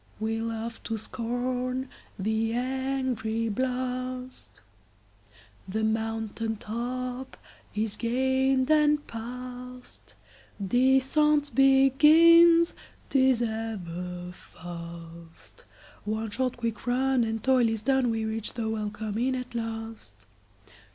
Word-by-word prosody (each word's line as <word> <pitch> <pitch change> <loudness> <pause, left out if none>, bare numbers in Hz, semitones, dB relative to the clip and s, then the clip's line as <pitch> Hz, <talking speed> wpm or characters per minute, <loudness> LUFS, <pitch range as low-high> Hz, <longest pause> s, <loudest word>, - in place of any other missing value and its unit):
We 225 +1 -1
laugh 230 0 -4
to 225 - -2
scorn 250 +3 -3 0.3
the 220 +3 0
angry 255 -3 -1
blast, 255 - -4 1.1
The 220 +3 -1
mountain 225 0 -1
top 250 +4 -5 0.4
is 215 0 -2
gained 260 +3 +1
and 300 -1 +4
past. 250 - -9 0.4
Descent 265 +6 +3
begins, 310 +6 +6 0.4
't 270 - +3
is 260 -2 +4
ever 180 -6 -4
fast—One 170 +5 -9
short 255 +3 -1
quick 230 0 -4
run, 260 0 +2
and 225 -1 -3
toil 255 -3 +4
is 225 -1 -3
done, 265 0 +2
We 225 -1 -1
reach 220 0 -3
the 230 -2 -2
welcome 215 0 -3
inn 260 +2 +1
at 250 -1 -6
last. 225 - -5
235 Hz, 95 wpm, -27 LUFS, 220-260 Hz, 1.1 s, begins